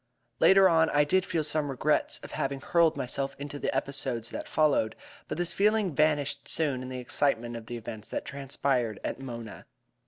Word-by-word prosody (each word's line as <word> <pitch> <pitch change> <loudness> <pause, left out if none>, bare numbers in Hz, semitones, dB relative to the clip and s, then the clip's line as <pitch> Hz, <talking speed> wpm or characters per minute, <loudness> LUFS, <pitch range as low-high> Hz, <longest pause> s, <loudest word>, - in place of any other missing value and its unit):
Later 195 0 +7
on 160 -2 +4
I 145 0 +4
did 185 +5 +2
feel 165 -3 -1
some 150 -1 0
regrets 140 +3 0
at - - -9
having 135 0 -2
hurled 165 +3 +3
myself 135 +2 -2
into 145 0 -6
the - - -2
episodes 130 -4 -2
that - - -5
followed, 145 -8 +2 0.3
but - - -4
this 175 0 -1
feeling 210 -3 +2
vanished 145 -2 +1
soon 145 -6 -1
in 130 - -6
the 130 - -5
excitement 120 -2 0
of 115 -1 -8
the 120 - -5
events 110 -1 -8
that - - -4
transpired 135 -5 -1
at - - -3
Mona. 120 -4 -8
140 Hz, 185 wpm, -29 LUFS, 125-155 Hz, 0.3 s, Later